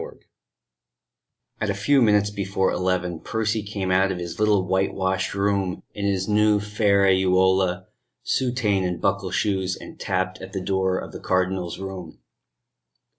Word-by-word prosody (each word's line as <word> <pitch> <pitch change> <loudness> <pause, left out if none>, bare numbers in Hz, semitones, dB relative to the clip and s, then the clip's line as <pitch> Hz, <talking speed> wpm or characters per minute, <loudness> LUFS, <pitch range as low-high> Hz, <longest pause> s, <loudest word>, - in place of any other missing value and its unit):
III - - -9 1.4
At 110 - 0
a 100 - 0
few 135 +7 +3
minutes 105 -2 +3
before 100 -1 -1
eleven 90 -2 -1
Percy 110 +2 -1
came 100 -2 -3
out 95 +1 +3
of 95 - -3
his 85 +1 -6
little 105 -3 +3
white 95 +1 0
washed 95 0 -1
room 100 -2 0
in 100 - -4
his 95 -1 0
new 105 0 +3
ferraiuola, 95 -3 +2 0.4
soutane 120 -7 0
and 90 -1 -2
buckle 100 -1 0
shoes, 95 -2 0
and - - -12
tapped 95 0 -2
at 95 +1 -9
the 95 - -2
door 95 0 0
of - - -6
the - - -8
Cardinal's 95 -1 -1
room. 95 -3 -7
95 Hz, 150 wpm, -24 LUFS, 95-105 Hz, 1.4 s, few